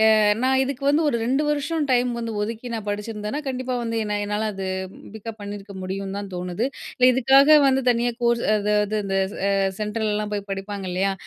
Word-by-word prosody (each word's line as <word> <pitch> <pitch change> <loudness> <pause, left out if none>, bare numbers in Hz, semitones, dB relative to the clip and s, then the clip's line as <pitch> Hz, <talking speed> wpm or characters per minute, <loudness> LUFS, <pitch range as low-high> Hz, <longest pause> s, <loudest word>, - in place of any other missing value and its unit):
அ - - +4 0.3
நான் 265 0 +3
இதுக்கு 270 0 -4
வந்து 295 +3 +3
ஒரு 235 - 0
2 270 +5 +1
வருஷம் 295 +2 0
டைம் 250 0 +3
வந்து 230 -1 -3
ஒதுக்கி, 225 +3 -5
நான் 220 -2 -5
படிச்சிருந்தேன்னா, 210 +5 -4
கண்டிப்பா 255 -1 -2
வந்து 230 -1 -2
என்ன 210 0 -1
என்னால 210 +1 -1
அது 195 -1 -4 0.5
பிக்கப் 220 +1 -7
பண்ணியிருக்க 200 -1 -7
முடியும்னு 195 +1 -4
தான் 200 -1 -7
தோணுது. 180 +6 -2 0.4
இதுக்காக 270 +4 +6
வந்து 270 0 +2
தனியா 240 0 +1
கோர்ஸ் 235 0 +2
அதாவது 210 0 +1
இந்த 195 0 0 0.3
அ - - +2 0.3
சென்ட்ரலலாம் 210 -1 -1
போய் 200 -1 -4
படிப்பாங்க, 195 0 -4
இல்லையா? 195 +2 +1
220 Hz, 175 wpm, -23 LUFS, 205-255 Hz, 0.5 s, இதுக்காக